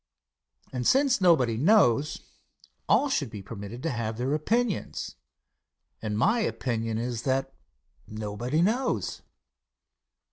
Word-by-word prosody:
And 125 -1 -1
since 270 -4 +3
nobody 130 -11 +4
knows, 150 - +3 0.7
all 290 - +4
should 150 - -1
be 105 -2 -8
permitted 105 +3 -8
to 165 - 0
have 115 -2 -3
their 130 +4 -1
opinions, 220 +7 -1 0.9
and 105 -1 -2
my 205 - +3
opinion 115 - -2
is 120 0 -3
that 135 +1 -1 0.5
nobody 110 +8 -2
knows. 245 +6 0
130 Hz, 110 wpm, -27 LUFS, 115-180 Hz, 0.9 s, nobody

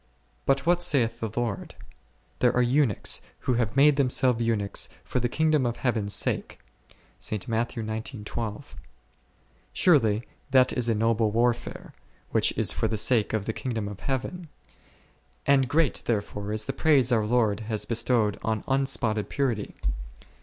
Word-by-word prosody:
But 135 +1 +2
what 175 +1 +3
saith 120 -9 +1
the 110 - -3
Lord: 115 -6 -3 0.6
There 125 - +4
are 125 - +3
eunuchs, 125 -3 +1 0.2
who 125 - 0
have 115 0 -1
made 145 0 +6
themselves 125 -3 +2
eunuchs 110 -3 0
for - - -2
the 120 0 0
kingdom 155 0 +2
of 120 -1 -1
Heaven 120 -5 0
s 100 - +4
sake - - -1 0.7
11. 110 +1 -3 1.5
Surely 115 - +3 0.2
that 130 -1 +4
is 120 -2 -1
a 115 - +2
noble 115 0 +2
war 120 +3 +3
fare, 120 - -10 0.4
which - - +3
is - - +2
for - - 0
the 110 - -2
sake 110 0 +3
of 110 -2 -1
the 110 - -2
kingdom 115 -6 -3
of 100 -1 -8
Heaven, 145 +6 -4 1.0
and 135 -2 +3
great 155 0 +1
therefore 105 -2 -2
is 110 0 -3
the 135 - -3
praise 135 -3 +3
our 110 -3 +2
Lord 110 -3 +2
has 110 -2 -3
be 115 - -3
stowed 115 -3 +1
on 110 -2 -2
unspotted 130 -6 0
purity. 125 -7 -2
120 Hz, 155 wpm, -26 LUFS, 110-135 Hz, 1.5 s, made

